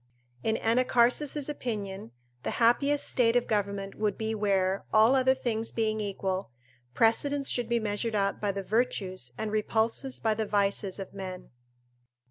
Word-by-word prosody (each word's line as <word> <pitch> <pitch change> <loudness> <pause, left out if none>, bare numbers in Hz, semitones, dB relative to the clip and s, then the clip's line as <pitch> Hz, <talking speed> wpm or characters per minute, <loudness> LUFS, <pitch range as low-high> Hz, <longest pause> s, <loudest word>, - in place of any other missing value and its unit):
In 220 - 0
Anacharsis' 250 +4 +2
opinion, 205 - -4 0.3
the - - -3
happiest 280 +5 +3
state 235 -2 +2
of 245 - +3
government 200 -2 -2
would 210 -2 -1
be 220 0 -2
where, 195 -2 +1
all 220 +4 +6
other 260 0 +4
things 230 -4 -1
being 215 -1 0
equal, 195 -2 -3 0.5
precedence 275 +5 +2
should 240 -2 -1
be 235 0 +2
measured 215 +1 -2
out 200 -1 0
by 205 -1 +1
the 195 0 -4
virtues, 190 - -1
and 215 -1 -3
repulses 225 +4 0
by 220 -1 +1
the 215 0 -2
vices 200 -1 0
of 195 -2 -7
men. 185 -2 -7
220 Hz, 150 wpm, -28 LUFS, 200-240 Hz, 0.5 s, all